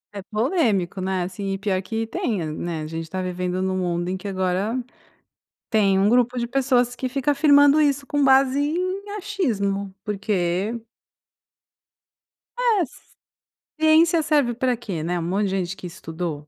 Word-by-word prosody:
É 200 Hz, -, -4 dB
polêmico, 210 Hz, -, 0 dB
né, 185 Hz, -1 st, -1 dB
assim, 195 Hz, +2 st, -4 dB
e -, -, -2 dB
pior 190 Hz, -2 st, -1 dB
que 225 Hz, +3 st, -3 dB
tem, 225 Hz, -2 st, -2 dB
hã, 155 Hz, -1 st, -4 dB
né. 165 Hz, -1 st, -4 dB
A -, -, -5 dB
gente 165 Hz, 0 st, -6 dB
tá 185 Hz, -, -4 dB
vivendo 180 Hz, 0 st, -2 dB
num 190 Hz, 0 st, -1 dB
mundo 175 Hz, 0 st, -1 dB
em 190 Hz, -, -1 dB
que, 195 Hz, +2 st, -7 dB
agora, 190 Hz, +5 st, -1 dB, 0.9 s
tem 200 Hz, -3 st, +3 dB
um 195 Hz, +1 st, +3 dB
grupo 245 Hz, +1 st, +3 dB
de 235 Hz, -, 0 dB
pessoas 245 Hz, -1 st, +1 dB
que 255 Hz, 0 st, -3 dB
fica 275 Hz, +2 st, 0 dB
afirmando 285 Hz, 0 st, +5 dB
isso 280 Hz, -1 st, +1 dB
com 290 Hz, 0 st, 0 dB
base 270 Hz, 0 st, +4 dB
em 370 Hz, +7 st, -2 dB
achismo, 210 Hz, -, -1 dB
porque 200 Hz, +1 st, -1 dB, 1.8 s
É, 440 Hz, -9 st, +3 dB
c -, -, -20 dB, 0.9 s
ciência 320 Hz, +2 st, +5 dB
serve 290 Hz, -6 st, +2 dB
para 250 Hz, +1 st, 0 dB
quê? 195 Hz, -9 st, -5 dB
Né. 175 Hz, +1 st, -1 dB
Um -, -, -3 dB
monte 195 Hz, +4 st, 0 dB
de -, -, -1 dB
gente 190 Hz, -1 st, -2 dB
que 180 Hz, -, -8 dB
estudou. 165 Hz, -4 st, -6 dB
210 Hz, 170 wpm, -23 LUFS, 185-275 Hz, 1.8 s, afirmando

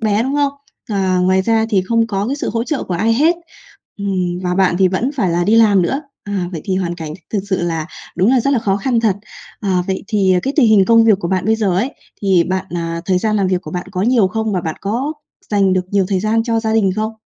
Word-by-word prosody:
bé, 215 Hz, -1 st, +1 dB
đúng 270 Hz, +3 st, -2 dB
không? 285 Hz, -1 st, +1 dB, 0.4 s
Ờ, 190 Hz, -3 st, +1 dB
ngoài 185 Hz, +1 st, +2 dB
ra 225 Hz, +1 st, +2 dB
thì 190 Hz, -3 st, +2 dB
không 230 Hz, -1 st, +2 dB
có 200 Hz, -1 st, -2 dB
cái 275 Hz, +3 st, -2 dB
sự -, -, -3 dB
hỗ 230 Hz, 0 st, -1 dB
trợ 300 Hz, -2 st, -2 dB
của 180 Hz, -, -3 dB
ai 220 Hz, +6 st, +1 dB
hết, 320 Hz, +7 st, +3 dB, 0.6 s
ừm, 185 Hz, -3 st, -2 dB
và 180 Hz, 0 st, -1 dB
bạn 185 Hz, -2 st, +2 dB
thì 190 Hz, -, +4 dB
vẫn 205 Hz, +9 st, -1 dB
phải 190 Hz, -9 st, +1 dB
là 175 Hz, +1 st, +1 dB
đi 220 Hz, +5 st, +3 dB
làm 205 Hz, -5 st, +5 dB
nữa, 270 Hz, -, -1 dB, 0.2 s
à, 200 Hz, -3 st, -2 dB
vậy 160 Hz, -, -4 dB
thì 190 Hz, -, -1 dB
hoàn 175 Hz, -2 st, -2 dB
cảnh 160 Hz, -3 st, -7 dB
th -, -, -12 dB
thực 205 Hz, -, +1 dB
sự 190 Hz, -2 st, 0 dB
là 165 Hz, -2 st, -2 dB, 0.3 s
đúng 190 Hz, +6 st, +3 dB
là 260 Hz, -2 st, +4 dB
rất 275 Hz, -, 0 dB
là 265 Hz, -, +3 dB
khó 195 Hz, -3 st, 0 dB
khăn 235 Hz, +3 st, 0 dB
thật. 210 Hz, -4 st, +1 dB, 0.4 s
Ờ, 185 Hz, -4 st, 0 dB
vậy 190 Hz, 0 st, -3 dB
thì 195 Hz, -4 st, +2 dB
cái 270 Hz, -, -1 dB
tình 260 Hz, -6 st, +5 dB
hình 210 Hz, -3 st, +5 dB
công 230 Hz, +1 st, +5 dB
việc 210 Hz, -4 st, +4 dB
của 170 Hz, -, -2 dB
bạn 185 Hz, -1 st, 0 dB
bây 220 Hz, +1 st, +2 dB
giờ 200 Hz, -5 st, 0 dB
ấy, 240 Hz, +9 st, 0 dB, 0.3 s
thì 185 Hz, -4 st, +3 dB
bạn, 185 Hz, +1 st, -2 dB
à 170 Hz, 0 st, -3 dB
thời 185 Hz, -1 st, +1 dB
gian 215 Hz, +1 st, 0 dB
làm 195 Hz, -2 st, +1 dB
việc 180 Hz, -1 st, 0 dB
của 155 Hz, -, -8 dB
bạn 180 Hz, +2 st, -4 dB
có 185 Hz, -1 st, -2 dB
nhiều 225 Hz, -4 st, +3 dB
không? 220 Hz, +1 st, -2 dB
Và 185 Hz, -, 0 dB
bạn 160 Hz, -1 st, -4 dB
có 245 Hz, +9 st, -2 dB, 0.4 s
dành 195 Hz, -3 st, +3 dB
được 185 Hz, -1 st, +1 dB
nhiều 200 Hz, -2 st, +2 dB
thời 195 Hz, -2 st, 0 dB
gian 220 Hz, +2 st, +1 dB
cho 230 Hz, -1 st, 0 dB
gia 220 Hz, -1 st, -1 dB
đình 210 Hz, -4 st, +3 dB
không? 220 Hz, +1 st, -1 dB
200 Hz, 275 wpm, -17 LUFS, 185-225 Hz, 0.6 s, làm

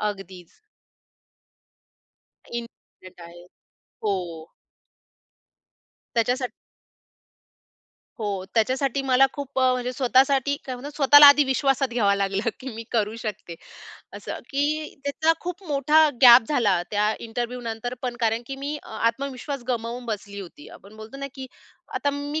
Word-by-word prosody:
अगदीच. 195 Hz, -4 st, -6 dB, 2.0 s
इंडिपेंडंट 210 Hz, -6 st, -10 dB
आहे. 175 Hz, +1 st, -14 dB, 0.6 s
हो. 205 Hz, -2 st, +1 dB, 2.0 s
त्याच्यासाठी 245 Hz, +2 st, 0 dB, 1.7 s
हो. 200 Hz, -3 st, -3 dB
त्याच्यासाठी 260 Hz, +4 st, +1 dB
मला 265 Hz, 0 st, +4 dB
खूप 280 Hz, -2 st, -6 dB
अ, 260 Hz, -1 st, +4 dB
म्हणजे 250 Hz, 0 st, -2 dB
स्वतःसाठी 265 Hz, +2 st, +2 dB
काय 255 Hz, -, -5 dB
म्हणतात 285 Hz, +4 st, -9 dB
स्वतःला 290 Hz, 0 st, +8 dB
आधी 285 Hz, 0 st, +7 dB
विश्वासात 270 Hz, 0 st, +1 dB
घ्यावं 215 Hz, -4 st, +2 dB
लागलं, 200 Hz, +3 st, -1 dB
की 265 Hz, -, -7 dB
मी 230 Hz, -, -6 dB
करू 215 Hz, -2 st, 0 dB
शकते 210 Hz, -6 st, -6 dB, 0.6 s
असं. -, -, -6 dB
की 295 Hz, +2 st, -1 dB
त्याचा 315 Hz, +3 st, +2 dB
खूप 360 Hz, +2 st, -6 dB
मोठा 300 Hz, +2 st, +4 dB
गॅप 245 Hz, 0 st, +10 dB
झाला 205 Hz, -, +2 dB
त्या 210 Hz, +1 st, +1 dB
इंटरव्ह्यनंतर 240 Hz, 0 st, -5 dB
पण, 245 Hz, -1 st, -3 dB
कारण 225 Hz, 0 st, +1 dB
की 270 Hz, -, -6 dB
मी 285 Hz, +2 st, -4 dB
अ, -, -, -15 dB
आत्मविश्वास 270 Hz, +3 st, -3 dB
गमावून 240 Hz, 0 st, -3 dB
बसली 205 Hz, -2 st, -5 dB
होती. 195 Hz, -, -12 dB
आपण 205 Hz, +2 st, -15 dB
बोलतो 220 Hz, +5 st, -10 dB
ना, 275 Hz, 0 st, -5 dB
की 265 Hz, -1 st, -7 dB, 0.5 s
आता 285 Hz, -, 0 dB
मी 290 Hz, +2 st, -4 dB
250 Hz, 125 wpm, -24 LUFS, 220-275 Hz, 2.0 s, गॅप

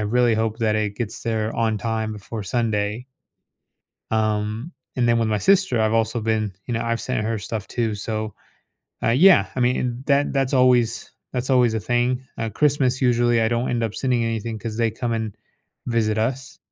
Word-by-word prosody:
really 115 Hz, +2 st, +2 dB
hope 110 Hz, 0 st, -1 dB
that 110 Hz, -2 st, +1 dB
it 105 Hz, -1 st, -2 dB
gets 115 Hz, -4 st, -4 dB
there 110 Hz, -1 st, -1 dB
on 115 Hz, -1 st, +1 dB
time 110 Hz, -1 st, -2 dB
before 105 Hz, +1 st, -6 dB
Sunday. 110 Hz, +1 st, -1 dB, 1.1 s
Um, 110 Hz, +6 st, -1 dB, 0.2 s
and 120 Hz, -1 st, +2 dB
then 115 Hz, 0 st, +4 dB
with 115 Hz, -1 st, +1 dB
my 105 Hz, -, +1 dB
sister, 190 Hz, -, +3 dB
I've 110 Hz, 0 st, +2 dB
also 115 Hz, +1 st, +1 dB
been 110 Hz, -2 st, 0 dB
you 120 Hz, -, -2 dB
know, 115 Hz, -, -1 dB
I've 115 Hz, 0 st, -1 dB
sent 125 Hz, -4 st, -2 dB
her 115 Hz, 0 st, -1 dB
stuff 105 Hz, 0 st, -5 dB
too, 115 Hz, -3 st, -1 dB
so. 110 Hz, 0 st, -4 dB, 0.7 s
Uh, -, -, +3 dB
yeah, 155 Hz, -, +6 dB
I -, -, -1 dB
mean, 125 Hz, +1 st, 0 dB
that 140 Hz, 0 st, +2 dB
that's 135 Hz, -1 st, 0 dB
always 125 Hz, -2 st, +3 dB, 0.2 s
that's 125 Hz, +1 st, -2 dB
always 125 Hz, -3 st, +4 dB
a 110 Hz, -, -1 dB
thing, 125 Hz, +3 st, 0 dB, 0.2 s
uh, 115 Hz, -1 st, -1 dB
Christmas 130 Hz, +1 st, +1 dB
usually, 120 Hz, -1 st, +3 dB
I 110 Hz, -, +2 dB
don't 120 Hz, +1 st, 0 dB
end 120 Hz, -1 st, 0 dB
up 110 Hz, -2 st, -2 dB
sending 125 Hz, -3 st, +1 dB
anything 115 Hz, 0 st, -3 dB
'cause 110 Hz, 0 st, -5 dB
they 115 Hz, -1 st, +1 dB
come 120 Hz, +1 st, -3 dB
and 110 Hz, -3 st, -3 dB, 0.5 s
visit 110 Hz, -2 st, +1 dB
us. 130 Hz, +4 st, -2 dB
115 Hz, 190 wpm, -22 LUFS, 110-125 Hz, 1.1 s, yeah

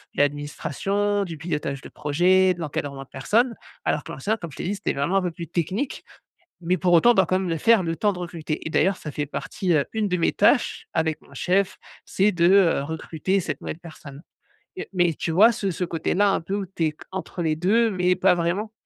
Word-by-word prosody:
l'administration, 195 Hz, +8 st, 0 dB
du 165 Hz, -4 st, -7 dB
pilotage 150 Hz, -4 st, -3 dB
de -, -, -10 dB
projet, 180 Hz, +5 st, +3 dB
de 175 Hz, -, -13 dB
l'encadrement 145 Hz, -3 st, -4 dB
de -, -, -21 dB
personnes. 230 Hz, -, +1 dB, 0.3 s
Alors -, -, 0 dB
que -, -, -9 dB
l'ancien 220 Hz, +2 st, -1 dB
comme 170 Hz, -6 st, -8 dB
je -, -, -13 dB
t'ai -, -, -5 dB
dit, 200 Hz, -, -1 dB
c'était -, -, -2 dB
vraiment 145 Hz, +8 st, 0 dB
un -, -, +3 dB
peu 180 Hz, -1 st, -2 dB
plus 170 Hz, 0 st, -8 dB
technique. 185 Hz, -, -2 dB, 0.6 s
Mais 180 Hz, +2 st, +1 dB
pour 175 Hz, +2 st, +2 dB
autant, 235 Hz, +9 st, +6 dB
on -, -, +4 dB
doit 190 Hz, -, +4 dB
quand 185 Hz, -, +2 dB
même 185 Hz, -2 st, -2 dB
le 165 Hz, -, 0 dB
faire 225 Hz, +2 st, +4 dB
le 165 Hz, 0 st, -2 dB
temps 205 Hz, +2 st, +1 dB
de 180 Hz, -, -8 dB
recruter 165 Hz, -3 st, -5 dB
et -, -, -2 dB
d'ailleurs 190 Hz, -1 st, +2 dB
ça 150 Hz, -, -7 dB
fait 145 Hz, +1 st, -3 dB
partie 180 Hz, +4 st, -2 dB
heu 145 Hz, -3 st, +2 dB
une 215 Hz, -2 st, 0 dB
de 180 Hz, -1 st, 0 dB
mes 165 Hz, -, +2 dB
tâches -, -, +2 dB
avec 160 Hz, -1 st, 0 dB
mon 140 Hz, -, -19 dB
chef, 185 Hz, +7 st, 0 dB, 0.3 s
c'est 205 Hz, +2 st, +2 dB
de, 170 Hz, -2 st, +1 dB
heu, 190 Hz, -7 st, +4 dB
recruter 160 Hz, +5 st, -2 dB
cette 155 Hz, -4 st, -5 dB
nouvelle 155 Hz, -, -5 dB
personne 155 Hz, -4 st, -11 dB, 0.6 s
et 385 Hz, -, -6 dB
mais 175 Hz, -3 st, +2 dB
tu 165 Hz, -, -3 dB
vois 220 Hz, +7 st, +6 dB
ce 195 Hz, -3 st, -2 dB
ce 180 Hz, -, -2 dB
côté-là 175 Hz, +4 st, +1 dB
un -, -, +1 dB
peu 190 Hz, +4 st, -5 dB
où 200 Hz, -2 st, -2 dB
t'es 160 Hz, -4 st, -2 dB, 0.2 s
entre 190 Hz, -1 st, -5 dB
les 155 Hz, -1 st, 0 dB
2 220 Hz, +7 st, +2 dB
mais 180 Hz, -1 st, +1 dB
pas 185 Hz, 0 st, +4 dB
vraiment? 175 Hz, +6 st, -1 dB
175 Hz, 230 wpm, -24 LUFS, 160-195 Hz, 0.6 s, autant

